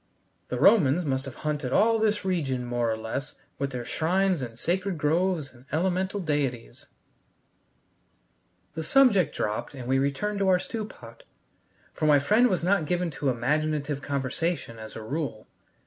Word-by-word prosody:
The - - -3
Romans 175 -5 +5
must 130 -2 -1
have 135 - -8
haunted 150 -4 -1
all 225 +8 +4
this 210 -2 +1
region 140 -9 -1
more 120 -1 0
or 110 - -2
less 110 +6 -5 0.2
with 140 0 -1
their 125 -2 -5
shrines 185 +2 +1
and 115 -3 -6
sacred 185 +5 -1
groves 160 0 0
and 125 +1 -18
elemental 185 +4 0
deities." 140 - -3 1.9
The 160 - -4
subject 200 - +4
dropped 105 +6 -3
and 125 -2 -7
we 135 +1 +2
returned 170 +10 -1
to 195 - +1
our 185 - +5
stew 215 +4 -4
pot, 115 - -13 0.7
for 155 - -1
my 150 -1 +6
friend 215 - +4
was 185 -7 0
not 180 -3 +2
given 175 0 0
to 140 -1 -1
imaginative 145 +3 -1
conversation 140 -2 -2
as 110 0 -9
a 110 - -7
rule. 135 -3 -4
150 Hz, 160 wpm, -27 LUFS, 130-185 Hz, 1.9 s, my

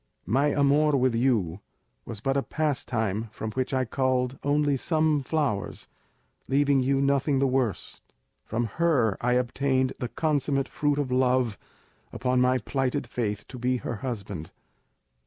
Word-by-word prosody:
My 135 +10 +2
amour 145 +1 +3
with 130 -1 +2
you 115 -8 +1 0.5
was 110 -3 -7
but 135 +3 0
a 140 - +2
pastime 115 -9 -2
from 110 0 -5
which 130 +3 -2
I 130 -1 +1
culled 130 +1 0
only 145 0 +2
some 155 +1 +1
flowers, 135 -8 -2 0.6
leaving 140 0 +3
you 135 +1 +1
nothing 140 0 +2
the 135 - +2
worse; 130 -7 -1 0.4
from 120 +2 -2 0.2
her 130 - +3
I 125 0 +3
obtained 130 +1 +1
the 125 - -2
consummate 140 -3 0
fruit 145 -1 0
of 140 -3 -1
love 125 -3 +2 0.6
upon 125 0 0
my 125 0 +3
plighted 130 +3 -1
faith 105 -4 -3
to 125 - -8
be 125 +1 +1
her 120 - -4
husband. 100 - -5
130 Hz, 145 wpm, -27 LUFS, 120-140 Hz, 0.6 s, amour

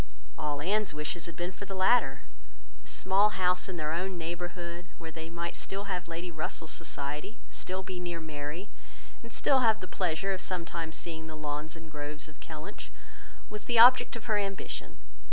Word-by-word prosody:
All 145 -1 -1
Anne's 205 -1 +2
wishes 150 +3 -2
had 170 - -7
been 175 +2 -2
for 200 - -7
the 195 0 -4
latter. 190 +6 +4 0.6
A - - -17
small 195 +3 +4
house 180 +1 +3
in 185 - -3
their 155 -2 -1
own 180 +3 -1
neighbourhood, 175 +1 -4
where 165 -1 -6
they 160 0 -6
might 170 0 -3
still 195 +1 -3
have 185 -4 -2
Lady 170 +1 -4
Russell's 160 0 -3
society, 150 +6 -3
still 185 +1 -3
be 185 -1 -4
near 175 -1 -2
Mary, 155 +4 -4 0.5
and 230 - -10
still 270 - +4
have 220 -3 +5
the 185 - -5
pleasure 185 +2 +1
of 185 - -3
sometimes 170 -3 -2
seeing 160 -2 -5
the 155 - -6
lawns 150 +1 -3
and 160 -1 -10
groves 150 +1 -4
of 155 - -14
Kellynch, 160 +6 -7 0.6
was 210 0 -6
the 240 - +2
object 245 +2 +9
of 230 - -6
her 215 -3 +3
ambition. 195 -1 -3
175 Hz, 185 wpm, -31 LUFS, 160-195 Hz, 0.6 s, object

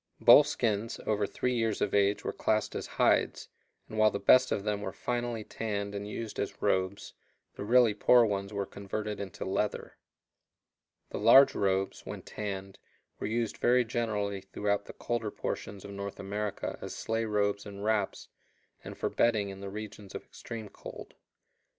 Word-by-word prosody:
Bull 150 - +9
skins 115 -6 -1
over 105 -1 +1
three 125 +5 -1
years 115 -3 0
of 105 - 0
age 100 0 +3
were - - -2
classed 110 0 0
as - - -4
hides, - - +2 0.4
and 110 - -5
while 110 0 +6
the 100 - -3
best 130 +4 +5
of 100 - 0
them 105 -1 -1
were 95 - -3
finally 120 -1 -3
tanned 100 -2 -3
and 100 0 -4
used 110 0 -5
as - - -3
robes, 95 +1 0 0.4
the - - -6
really 120 0 +5
poor 120 +3 +5
ones 100 -1 -2
were 100 -1 -2
converted 105 +2 -5
into 100 -3 -6
leather. - - -2 1.1
The - - -3
large 120 +6 +8
robes, 95 0 0
when - - -7
tanned, 95 -2 -6 0.4
were - - -2
used 115 +1 -1
very 125 0 +3
generally 105 -4 -2
throughout 100 +1 -1
the - - -9
colder 120 -3 -2
portions 100 -1 -5
of 100 - -8
North 100 0 -6
America 100 +1 -3
as - - -6
sleigh 115 0 -1
robes 100 -1 0
and 100 0 -8
wraps, 110 -3 0 0.6
and - - -8
for - - -1
bedding 110 -4 +2
in 95 0 -8
the 100 - -5
regions 105 -1 -8
of - - -6
extreme 115 -2 -8
cold. - - -10
105 Hz, 170 wpm, -30 LUFS, 100-115 Hz, 1.1 s, Bull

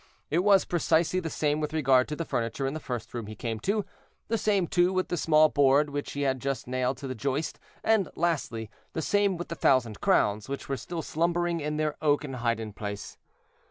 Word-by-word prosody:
It 160 - +3
was 200 -2 +5
precisely 170 +1 +2
the 165 -3 -4
same 150 -1 0
with 150 0 -3
regard 135 -4 +4
to 150 - -3
the 165 - -4
furniture 115 +2 -2
in 135 - -1
the 155 - -4
first 125 -6 -5
room 115 -3 -4
he 110 - -7
came 115 +1 -4
to; 205 - 0 0.4
the 225 - +2
same, 200 -4 +2
too, 175 +2 +2
with 185 -1 -1
the - - 0
small 155 -1 +5
board 145 +1 +3
which 145 0 -4
he 145 - -3
had 130 -2 0 0.2
nailed 130 +1 -1
to 140 - -6
the 130 - -3
joist; 140 +5 -2 0.2
and 220 -4 +3
lastly, 130 -10 -1 0.2
the 160 - -2
same 200 -1 +2
with 175 - -6
the - - -3
thousand 120 -8 +2
crowns, 105 +3 +2
which 140 - -5
were 135 - -1
still 165 +4 -5
slumbering 170 +1 0
in 150 0 -2
their 155 -1 -1
oaken 145 -2 +1
hiding 115 -3 -1
place. 105 0 -6
150 Hz, 210 wpm, -28 LUFS, 130-170 Hz, 0.4 s, was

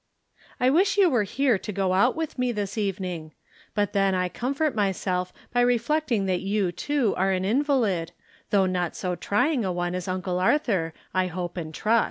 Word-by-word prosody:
I 255 +1 +4
wish 375 +7 +3
you 380 -4 +5
were 240 -4 +3
here 255 0 +1
to 210 - -5
go 190 -2 0
out 220 +7 +3
with 320 -4 -4
me 250 -1 +1
this 205 -3 -3
evening; 185 -7 -3 0.4
but 205 -1 0
then 195 -1 +2
I 180 0 0
comfort 275 - -1
myself 185 -3 -1 0.2
by 245 - +3
reflecting 245 -1 +1
that 185 -2 0
you, 195 -2 0
too, 260 - 0
are 190 +1 +2
an 185 0 0
invalid, 225 - +1 0.4
though 195 -2 +3
not 180 -2 -1
so 180 -1 -2
try 210 - +1
ing 260 -7 0
a 190 - -1
one 175 0 -2
as 180 0 -4
Uncle 185 -1 -2
Arthur, 190 - +1 0.2
I 185 0 +2
hope 175 0 -5
and 165 -3 -5
trust. 220 +8 +2
195 Hz, 195 wpm, -25 LUFS, 185-245 Hz, 0.4 s, you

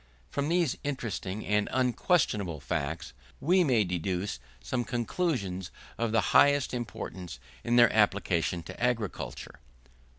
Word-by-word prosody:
From 145 +1 -1
these 170 -5 +2
interesting 110 -7 -3
and 105 0 +1
unquestionable 125 - +1
facts, 70 0 -3 0.3
we 180 +5 +4
may 125 -8 +3
deduce 90 0 -2 0.2
some 120 - -2
conclusions 120 - -2 0.3
of 115 -1 -1
the 115 - +3
highest 145 -2 +5
importance 95 - -5 0.2
in 120 - +1
their 120 -1 +6
application 95 -5 +2
to 100 - -7
agriculture. 115 -5 -2
110 Hz, 120 wpm, -29 LUFS, 90-130 Hz, 0.3 s, their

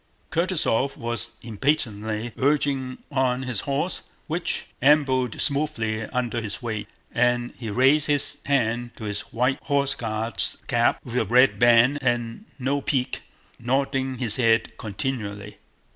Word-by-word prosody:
Kutúzov 160 -7 +1
was 120 0 -3
impatiently 110 -2 -1
urging 135 -2 0
on 130 -2 +1
his 125 -5 -2
horse, 145 - -2 0.2
which 170 +3 -2 0.2
ambled 130 -4 +3
smoothly 115 -7 +1
under 120 -2 -2
his 105 -2 -3
weight, 110 -4 -4 0.2
and 120 0 +1
he 115 -3 -6
raised 135 +7 +4
his 145 0 +1
hand 120 -3 0
to - - -9
his 105 -1 -3
white 125 +3 +1
Horse 140 -2 +1
Guard's 115 -1 -1
cap 120 -2 +1
with 125 -1 -4
a 110 - +1
red 125 +5 +4
band 120 +4 +5
and 120 - -1
no 140 +2 -1
peak, 130 -2 -1 0.4
nodding 135 +1 0
his 120 -4 +2
head 115 -2 +2
continually. 105 -3 -4
125 Hz, 130 wpm, -24 LUFS, 115-140 Hz, 0.4 s, band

